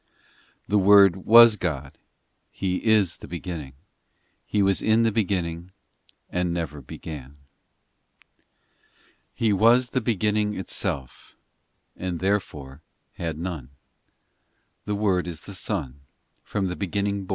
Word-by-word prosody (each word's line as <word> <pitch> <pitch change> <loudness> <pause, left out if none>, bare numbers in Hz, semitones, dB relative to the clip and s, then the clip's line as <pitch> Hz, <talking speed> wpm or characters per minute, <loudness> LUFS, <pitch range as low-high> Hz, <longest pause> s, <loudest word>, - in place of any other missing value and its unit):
ii - - -41 0.5
The 105 - +3
Word 100 -2 +7
was 115 -1 +8
God, 70 -7 -4 0.5
He 90 -1 -2
is 105 -6 +2
the - - -11
Beginning; 85 -5 -6 0.7
He 105 -1 +1
was 95 -1 +2
in 110 +1 +3
the 115 - +2
Beginning, 90 -5 -2 0.6
And 90 -1 -1
never 80 -4 -4
began. 70 +1 -8
in 70 +2 -19 1.9
He 110 -3 0
was 115 +4 +4
the 130 - 0
Beginning 105 -1 0
itself, 70 -8 -5 0.6
And 90 -2 -4
therefore 80 -8 -3 0.4
had 80 -3 -3
none; 80 -6 -5 1.2
The 105 - -2
Word 95 -4 0
is 85 -2 -6
the 100 - -10
Son, 80 - -4 0.4
From 100 -2 -2
the 90 -1 -3
beginning 100 +1 -2
born. - - -18
95 Hz, 125 wpm, -24 LUFS, 85-105 Hz, 1.9 s, was